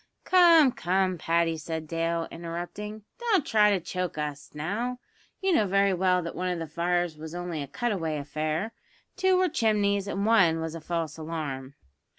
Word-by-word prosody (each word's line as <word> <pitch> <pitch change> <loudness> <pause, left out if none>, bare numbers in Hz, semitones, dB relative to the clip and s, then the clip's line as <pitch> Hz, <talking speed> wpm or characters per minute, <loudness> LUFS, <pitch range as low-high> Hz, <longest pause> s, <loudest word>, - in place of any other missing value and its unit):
"Come, 335 -6 +6
come, 185 -2 0
Paddy," 165 0 +1
said 160 0 -5
Dale, 165 0 -1
interrupting; 175 +6 -6 0.2
"don't 440 - +2
try 210 -2 +4
to 200 -2 +2
choke 180 -1 -4
us, 150 -1 -4
now; 210 +12 -2 0.4
you 380 -1 +2
know 215 -10 +3
very 195 +1 +3
well 180 0 +2
that 170 - -5
one 185 0 -2
of 180 - -1
the 165 - -4
fires 170 +1 -1
was 160 +2 -7
only 175 -3 -4
a 140 - -5
cut 240 - -2
away 165 -6 -2
affair; 155 +8 -2 0.4
two 375 -1 +3
were 370 0 +3
chimneys, 205 - +1
and 200 0 -2
one 190 -8 +4
was 160 0 -4
a 165 - -7
false 165 -2 -3
alarm." 145 -4 -5
175 Hz, 175 wpm, -27 LUFS, 160-210 Hz, 0.4 s, Come